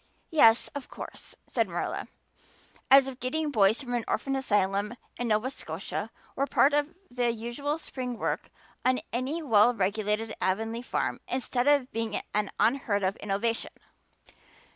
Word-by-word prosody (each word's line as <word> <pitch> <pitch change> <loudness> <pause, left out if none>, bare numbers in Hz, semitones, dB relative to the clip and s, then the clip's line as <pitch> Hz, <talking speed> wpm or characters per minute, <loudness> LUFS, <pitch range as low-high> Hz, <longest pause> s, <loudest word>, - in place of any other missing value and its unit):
"Yes, 230 -8 +6
of 285 -3 -6
course," - - -8
said - - 0
Marilla, - - -3 0.8
as 270 0 +8
if 265 -1 -7
getting 305 +4 -1
boys 215 +2 +3
from 245 -2 -2
orphan 270 0 -1
asylums 205 -3 +1 0.2
in 245 - -2
Nova 220 +4 +1
Scotia 195 +1 -5 0.3
were 275 - 0
part 285 +1 +4
of 295 +2 +1 0.2
the 245 -1 +1
usual 240 +7 -3
spring 255 -6 -5
work - - -2 0.3
on 255 0 +3
any 270 +7 -1
well 235 -2 +5
regulated 210 +2 0
Avonlea 225 +5 0
farm 245 - -2
instead 255 0 -1
of 285 -3 +4
being 225 -2 -2
an 210 0 +1
unheard 225 -5 +2
of 190 +2 +1
innovation. 210 +3 -1
240 Hz, 140 wpm, -28 LUFS, 210-270 Hz, 0.8 s, as